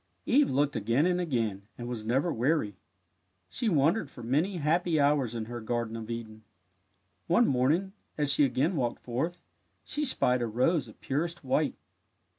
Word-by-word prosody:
Eve 280 +3 +4
looked 140 +1 +1
again 115 +8 +2
and 180 0 +2
again, 115 - -2
and 120 - -6
was 120 -3 -4
never 135 +9 +1
weary. 120 - 0 0.8
She 235 - 0
wandered 160 +2 +2
for 120 - -11
many 155 - 0
happy 165 +1 +1
hours 140 -5 +2
in 115 -1 -3
her 120 +1 -6
Garden 115 0 -2
of 115 0 -7
Eden. 110 -2 -6 0.9
One 175 +8 +4
morning, 150 +10 +1 0.2
as 145 -2 +2
she 145 - +4
again 140 +7 +1
walked 125 -5 -2
forth, 140 +9 -2 0.5
she 300 - -3
spied 125 - +2
a 120 - 0
rose 130 +6 +1
of 110 - -15
purest 165 +5 -2
white. 140 +3 +1
135 Hz, 165 wpm, -29 LUFS, 120-165 Hz, 0.9 s, Eve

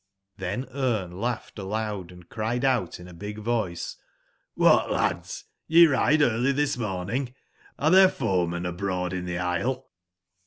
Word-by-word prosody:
^hen 100 +8 -3
Brne 115 -10 -1
laughed 115 +3 -4
aloud 100 -2 -3
and 90 -1 -14
cried 115 +4 -2
out 125 -12 0
in 90 - -10
a 90 - -12
big 105 +5 -7
voice: 110 -6 -2 0.6
^hat, - - +5
lads - - -1 0.3
t 160 - -4
ye 170 - +11
ride 150 0 +3
early 120 +1 +2
this 145 +1 0
morn 95 -5 -3
ing; 125 0 -2 0.4
are 155 +2 +2
there 190 0 +8
foemen 90 - -1
abroad 90 0 -2
in 90 -1 -3
the 90 -1 -3
isle 105 +10 -2
110 Hz, 155 wpm, -26 LUFS, 90-130 Hz, 0.6 s, ye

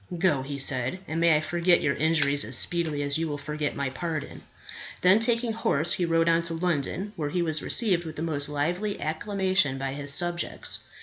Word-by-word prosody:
"Go," 165 -6 +2
he 140 +1 -6
said, 130 +1 +2
"and 160 +2 -2
may 170 -2 +5
I - - -1
forget 175 +2 +2
your 140 - 0
injuries 145 -2 +2
as - - 0
speedily 160 -4 0
as 140 +2 +1
you 165 - -1
will 145 -1 -4
forget 150 0 -3
my 140 -2 -2
pardon." 155 +1 -5 0.6
Then 185 +4 +5
taking 230 0 +1
horse, 170 -7 +1
he 180 - 0
rode 165 0 +2
on 165 0 +3
to 170 0 -3
London, 180 +4 -2
where 150 -5 -3
he 175 +3 -1
was 155 -2 0
received 190 -7 +2
with 160 -2 -8
the 155 - -4
most 150 -3 -1
lively 175 +8 -2
acclamation 185 -2 0
by 135 0 -3
his 145 0 -1
subjects. 175 +3 -1
160 Hz, 200 wpm, -26 LUFS, 145-175 Hz, 0.6 s, may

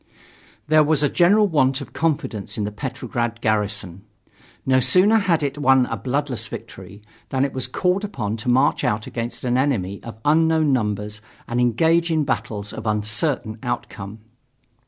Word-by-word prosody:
There 155 0 +5
was 150 -1 +2
a 145 - +3
general 205 +7 +4
want 135 -6 +2
of 140 - -10
confidence 140 -10 -2
in 105 - -1
the 105 - -3
Petrograd 120 -1 -4
garrison. 105 -4 -1 0.6
No 130 0 +4
sooner 190 - +4
had 175 -6 +1
it 145 +1 -2
won 130 -2 +4
a 115 - -3
bloodless 125 +4 -2
victory, 100 +2 -10 0.3
than 135 0 +1
it 140 - -4
was 130 -1 -2
called 180 +9 0
upon 110 - -3
to 115 - -4
march 130 +4 +3
out 105 +1 0
against 115 0 -5
an 125 0 +1
enemy 100 -9 -1
of 115 -1 -9
unknown 160 -1 +3
numbers 105 -2 -2 0.3
and 120 +1 0
engage 165 +8 +2
in 160 -2 +1
battles 110 -6 -3
of - - -6
uncertain 110 +2 0
outcome. 100 +3 -5
130 Hz, 160 wpm, -22 LUFS, 110-150 Hz, 0.6 s, There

